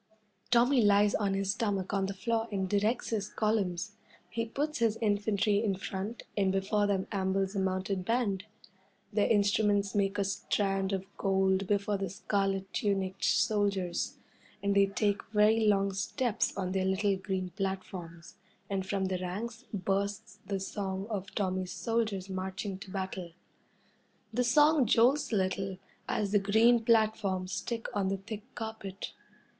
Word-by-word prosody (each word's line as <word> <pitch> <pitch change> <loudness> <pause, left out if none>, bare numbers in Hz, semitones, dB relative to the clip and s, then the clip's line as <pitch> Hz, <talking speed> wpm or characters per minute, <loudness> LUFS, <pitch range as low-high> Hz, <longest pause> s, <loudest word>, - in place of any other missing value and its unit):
Tommy 245 +2 +5
lies 205 0 +5
on 200 -2 +1
his 195 0 +1
stomach 200 -3 -1
on 195 -1 +1
the 200 - -3
floor 225 +2 -1
and 190 -2 -1
directs 210 +5 +1
his 210 -3 -1
columns. 205 -2 -1 0.3
He 230 0 -2
puts 295 +5 -2
his 225 -2 +2
infantry 205 -1 +1
in 200 -3 +1
front, 195 +4 -5
and 195 -2 +2
before 200 +2 +1
them 195 -2 0
ambles 195 0 0
a - - +1
mounted 190 0 -1
band. 210 -3 0 0.7
Their 205 0 +3
instruments 205 -1 +2
make 200 -1 +1
a 200 - +2
strand 195 0 0
of 190 -1 -2
gold 190 0 +2
before 205 0 +1
the 195 -1 -3
scarlet 195 0 -1
tunicked 195 -2 -1
soldiers, 200 -4 +1 0.5
and 200 0 +1
they 200 0 +5
take 205 0 0
very 215 +1 +3
long 195 -1 +3
steps 235 +4 -1
on 185 -2 -1
their 190 0 0
little 190 +1 +1
green 190 -1 -3
platforms, 185 -3 -5 0.3
and 195 -1 0
from 195 -1 0
the 185 -1 -1
ranks 215 +6 -5
bursts 200 +1 -2
the 195 -1 -1
song 195 0 -3
of 200 -2 -4
Tommy's 185 -2 -1
soldiers 220 -5 -1
marching 190 +1 -4
to 195 - -10
battle. 190 -3 -4 1.0
The 250 +2 +2
song 295 +2 +5
jolts 250 +7 +4
a - - +1
little 190 0 -1 0.3
as 205 -2 0
the 205 - +4
green 225 +4 +4
platforms 215 -5 +2
stick 230 +3 -3
on 200 -2 +1
the 195 +1 0
thick 205 +2 -7
carpet. 220 -4 -6
200 Hz, 150 wpm, -31 LUFS, 190-215 Hz, 1.0 s, Tommy